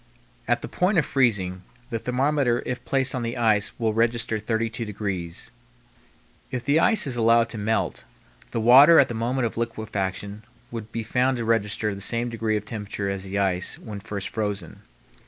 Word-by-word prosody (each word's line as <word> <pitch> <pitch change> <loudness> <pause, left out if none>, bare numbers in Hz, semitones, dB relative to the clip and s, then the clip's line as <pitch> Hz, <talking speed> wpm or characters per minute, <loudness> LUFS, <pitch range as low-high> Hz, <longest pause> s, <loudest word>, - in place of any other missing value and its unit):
At - - +1
the - - -4
point 180 +2 +1
of 160 - +3
freezing, 100 -9 +1 0.3
the 115 - -1
thermometer 125 0 +1
if 125 - -4
placed 135 -1 +1
on 130 - -2
the 115 0 -3
ice 110 -3 +2
will 110 -2 0
register 115 0 +1
32 115 +2 -2
degrees. 100 -5 -5 1.0
If 125 -2 -4
the 145 +3 +3
ice 220 +1 +4
is 135 -3 -1
allowed 115 0 +4
to 115 - -5
melt, 110 +2 -1 0.5
the - - -2
water 135 +8 +8
at 135 - +4
the - - -3
moment 120 +3 -1
of 115 - -4
liquefaction 105 -3 -3 0.3
would 115 -2 -7
be 115 0 -3
found 125 +3 +1
to 115 - -3
register 105 -2 0
the 100 - -8
same 120 +4 -1
degree 115 -2 -1
of 105 - -6
temperature 105 -2 -4
as 100 0 -4
the 95 +1 -4
ice 95 -2 0
when 105 -2 -8
first 100 -1 -5
frozen. 105 -6 -4
115 Hz, 180 wpm, -24 LUFS, 105-120 Hz, 1.0 s, water